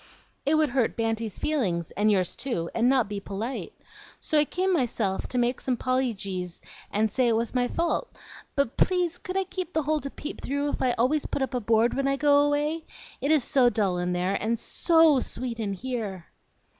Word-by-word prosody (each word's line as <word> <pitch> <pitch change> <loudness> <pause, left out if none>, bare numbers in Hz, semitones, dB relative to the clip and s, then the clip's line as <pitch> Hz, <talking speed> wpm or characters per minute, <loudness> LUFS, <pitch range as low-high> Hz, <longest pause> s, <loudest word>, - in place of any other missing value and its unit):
"It 305 - +4
would 310 -2 +3
hurt 245 -2 +1
Banty's 225 -2 -2
feelings, 190 - -1
and 210 +1 +1
yours 185 -4 +1
too, 205 -11 -3
and 235 +2 +3
not 260 -5 +3
be 205 0 -4
polite. 205 +6 -5 0.5
So 310 - +1
I 295 - +4
came 370 +5 0
myself, 230 - 0
to 250 - -4
make 245 +1 +1
some 255 -2 0
pollygies, 200 -9 -2 0.3
and 215 +1 +1
say 255 +3 +2
it 230 - +3
was 230 +1 -1
my 250 -1 +2
fault. 340 - -1 0.5
But, 280 -4 0
please, 355 -2 +1
could 370 +1 -4
I 385 - +2
keep 370 -1 -6
the 315 - +1
hole 305 +2 +1
to 280 - -5
peep 295 - -7
through, 285 +2 -1
if - - -3
I 255 -2 +2
always 260 +6 +1
put 275 - -1
up 265 - -3
a 250 - +1
board 225 +2 +3
when 275 0 0
I 275 - +2
go 285 +1 +4
away? 295 +2 +1 0.4
It 280 - 0
is 305 -4 +4
so 255 -3 +4
dull 195 -6 0
in 180 0 -1
there, 180 +2 0
and 225 +3 0
SO 325 +2 +4
sweet 240 -1 -4
in 205 -3 -1
here!" 205 -5 -4
250 Hz, 205 wpm, -26 LUFS, 215-290 Hz, 0.5 s, It